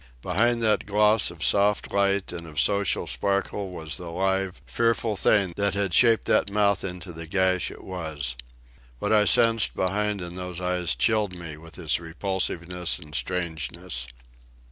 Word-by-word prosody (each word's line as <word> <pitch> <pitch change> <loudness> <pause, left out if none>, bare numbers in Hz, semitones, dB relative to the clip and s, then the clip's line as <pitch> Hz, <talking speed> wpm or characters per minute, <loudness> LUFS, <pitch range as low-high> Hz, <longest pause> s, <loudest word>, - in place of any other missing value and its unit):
Behind 115 +6 +1
that 105 -2 +2
gloss 105 +1 +4
of 85 -2 -8
soft 100 0 +2
light 100 -1 +1
and 85 -1 -7
of 75 -2 -5
social 100 +8 +1
sparkle 100 0 -1
was 80 -3 -4
the 90 -1 -7
live, 95 +1 -1
fearful 115 -2 0
thing 95 -2 +2
that 100 -1 +1
had 100 -3 -1
shaped 115 +2 +5
that - - +2
mouth 100 0 +2
into 90 -1 -6
the 80 0 -8
gash 95 0 +1
it - - -12
was. 80 -9 -4 0.6
What - - -1
I 105 -1 +5
sensed 115 0 +4
behind 105 +2 0
in 90 -1 -6
those 90 -1 -5
eyes 90 -2 0
chilled 105 -5 +1
me 85 -3 -7
with 80 +1 -13
its 85 -3 0
repulsiveness 90 0 -1
and 75 0 -12
strangeness. 80 -1 -3
95 Hz, 160 wpm, -25 LUFS, 85-100 Hz, 0.6 s, shaped